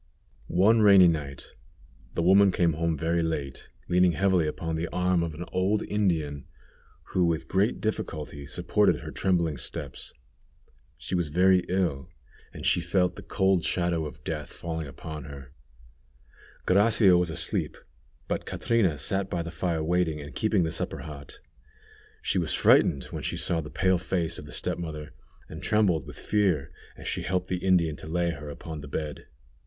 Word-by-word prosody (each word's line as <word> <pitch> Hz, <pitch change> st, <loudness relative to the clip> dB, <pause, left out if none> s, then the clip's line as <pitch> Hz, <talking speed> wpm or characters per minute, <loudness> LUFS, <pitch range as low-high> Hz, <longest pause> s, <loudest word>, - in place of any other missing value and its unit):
One 110 Hz, +6 st, +4 dB
rainy 100 Hz, -3 st, +8 dB
night 70 Hz, -5 st, -3 dB, 0.6 s
the 85 Hz, -, 0 dB
woman 95 Hz, +2 st, +6 dB
came 85 Hz, -2 st, +2 dB
home 80 Hz, 0 st, -1 dB
very 85 Hz, +2 st, 0 dB
late, 75 Hz, -5 st, -4 dB, 0.2 s
leaning 90 Hz, 0 st, +4 dB
heavily 90 Hz, -1 st, +2 dB
upon 80 Hz, +1 st, -3 dB
the 80 Hz, +2 st, -2 dB
arm 90 Hz, -1 st, +1 dB
of 85 Hz, -2 st, -3 dB
an 85 Hz, +3 st, -6 dB
old 95 Hz, +3 st, +1 dB
Indian, 80 Hz, -9 st, -1 dB, 0.6 s
who 90 Hz, -, +1 dB
with 80 Hz, -1 st, 0 dB
great 100 Hz, +4 st, +1 dB
difficulty 75 Hz, -9 st, -4 dB
supported -, -, +1 dB
her -, -, -7 dB
trembling 85 Hz, -6 st, 0 dB
steps. -, -, -7 dB, 0.9 s
She -, -, -6 dB
was 85 Hz, -3 st, +1 dB
very 90 Hz, +4 st, +4 dB
ill, 85 Hz, -5 st, -1 dB, 0.4 s
and -, -, -8 dB
she 90 Hz, -, +3 dB
felt 90 Hz, +1 st, +1 dB
the -, -, -9 dB
cold 95 Hz, -3 st, +1 dB
shadow 85 Hz, -3 st, 0 dB
of -, -, -12 dB
death -, -, -4 dB
falling 80 Hz, -2 st, -5 dB
upon 75 Hz, +1 st, -8 dB
her. 70 Hz, -2 st, -10 dB, 1.1 s
Gracia 100 Hz, 0 st, +5 dB
was 90 Hz, -1 st, +2 dB
asleep, 80 Hz, -, -2 dB, 0.5 s
but -, -, -3 dB
Catrina 100 Hz, -10 st, +1 dB
sat 95 Hz, +5 st, -2 dB
by 85 Hz, -1 st, -2 dB
the 85 Hz, -, -6 dB
fire 80 Hz, -1 st, -1 dB
waiting, 85 Hz, -2 st, +1 dB
and 75 Hz, 0 st, -9 dB
keeping 110 Hz, -4 st, +1 dB
the 80 Hz, -, -1 dB
supper -, -, -3 dB
hot. 70 Hz, -2 st, -10 dB, 0.8 s
She -, -, +1 dB
was -, -, -1 dB
frightened 70 Hz, -2 st, +4 dB
when -, -, -5 dB
she -, -, -3 dB
saw 85 Hz, -2 st, 0 dB
the 75 Hz, -, -8 dB
pale 95 Hz, +2 st, +2 dB
face 85 Hz, -2 st, -2 dB
of 75 Hz, -, -10 dB
the -, -, -11 dB
step -, -, -2 dB
mother, 75 Hz, -3 st, -6 dB, 0.3 s
and -, -, -9 dB
trembled 95 Hz, -9 st, +2 dB
with -, -, -10 dB
fear 95 Hz, -9 st, 0 dB, 0.3 s
as -, -, -9 dB
she -, -, -2 dB
helped 90 Hz, 0 st, -2 dB
the 90 Hz, -1 st, -2 dB
Indian 85 Hz, -5 st, +3 dB
to -, -, -9 dB
lay 85 Hz, +1 st, 0 dB
her 75 Hz, -1 st, -8 dB
upon 75 Hz, +1 st, -7 dB
the 75 Hz, -, -9 dB
bed. 75 Hz, +1 st, -5 dB
85 Hz, 170 wpm, -27 LUFS, 75-95 Hz, 1.1 s, rainy